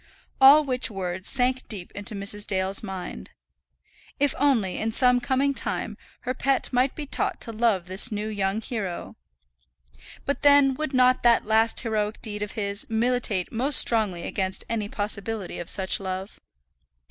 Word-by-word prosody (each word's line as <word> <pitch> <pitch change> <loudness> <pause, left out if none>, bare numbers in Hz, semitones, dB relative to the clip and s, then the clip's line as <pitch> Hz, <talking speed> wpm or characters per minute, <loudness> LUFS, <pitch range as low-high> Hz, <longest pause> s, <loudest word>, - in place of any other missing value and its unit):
All 285 +3 +8
which 255 -2 0
words 185 -2 -2
sank 255 0 +1
deep 195 -5 -5
into 205 +1 -6
Mrs. 200 +1 -1
Dale's 190 0 -1
mind. 190 -4 -7 0.9
If 285 -1 +2
only, 245 -10 +1
in 225 +1 -2
some 250 +1 +3
coming 275 +2 0
time, - - -2 0.3
her 255 - -3
pet 270 +1 -1
might 255 +2 +1
be 300 - -6
taught 390 +6 -3
to 230 - -3
love 220 -5 0
this 185 +4 +6
new 210 0 -3
young 205 0 -2
hero! 205 -7 -5 1.1
But 280 - -2
then 285 -2 +5
would 285 0 -4
not 255 0 +4
that 235 -1 +3
last 220 +1 +2
heroic 215 -2 -2
deed 210 -2 -3
of 210 - -5
his 200 -1 -4
militate 225 -4 0
most 260 +5 +3
strongly 210 -7 +3
against 190 -2 -3
any 215 -3 -3
possibility 205 -1 -4
of 175 - -5
such 190 -1 +1
love! 190 0 -6
220 Hz, 160 wpm, -25 LUFS, 200-255 Hz, 1.1 s, All